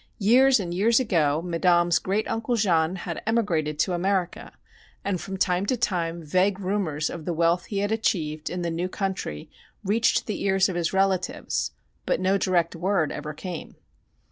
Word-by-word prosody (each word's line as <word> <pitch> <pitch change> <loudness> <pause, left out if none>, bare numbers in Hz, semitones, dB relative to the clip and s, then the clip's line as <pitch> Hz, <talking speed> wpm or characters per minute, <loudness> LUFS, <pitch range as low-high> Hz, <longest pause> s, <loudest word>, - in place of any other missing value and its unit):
Years 250 +5 +5
and 175 -3 -4
years 225 +6 +3
ago 165 - +1
Madame's 175 -1 +2
great 200 +3 -1
uncle 225 +2 -1
Jean 175 -5 +2
had 175 -2 -5
emigrated 170 -10 0
to 180 +4 +1
America, 185 0 -1 0.5
and 190 -3 -1
from 195 -1 -5
time 185 +1 +1
to 255 - +1
time 170 -7 -1
vague 185 +5 +1
rumors 185 -6 -1
of 165 -3 -6
the 175 - -2
wealth 170 +2 +2
he 205 - -5
had 205 - -3
achieved 155 -9 -1
in 180 0 -4
the 170 - -1
new 175 +3 -2
country 190 - -4 0.4
reached 215 +4 +2
the 210 - -4
ears 195 -1 +3
of 185 - -4
his 170 -1 0
relatives 190 -1 0 0.3
but - - +1
no 190 +1 +2
direct 175 -3 +1
word 175 -2 0
ever 150 -1 -6
came. 175 0 -7
185 Hz, 170 wpm, -25 LUFS, 170-200 Hz, 0.5 s, Years